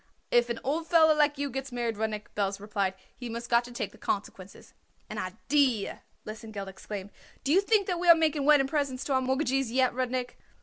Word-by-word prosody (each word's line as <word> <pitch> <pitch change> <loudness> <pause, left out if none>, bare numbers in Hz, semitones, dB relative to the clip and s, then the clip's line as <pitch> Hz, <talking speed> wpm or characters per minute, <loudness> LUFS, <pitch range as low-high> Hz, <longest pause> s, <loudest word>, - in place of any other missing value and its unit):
"If 240 0 +4
an 235 - -2
old 320 +5 -1
feller 320 -2 +6
like 295 -1 +2
you 285 -1 -2
gets 270 +1 -5
married, 240 -2 -2
Rudnik," 215 0 -4
Belz 200 -1 -1
replied, 200 -2 -2 0.2
"he 245 -2 -7
must 235 +1 -6
got 235 +1 +5
to 245 - -10
take 210 -4 -4
the - - -18
consequences." 195 -1 -5 0.4
"An - - -4
idee!" 260 -8 +1 0.3
Lesengeld 215 -2 -7
exclaimed. 195 +1 -7 0.3
"Do 275 - 0
you 375 +5 +5
think 405 0 +2
that 360 -2 -2
we 350 0 +1
are 335 - +11
making 315 -3 +1
wedding 295 -2 +6
presents 275 -2 -1
to 280 - -1
our 260 - +3
mortgagees 265 -1 0
yet, 255 0 +2
Rudnik?" 250 0 -2
255 Hz, 205 wpm, -28 LUFS, 220-290 Hz, 0.4 s, are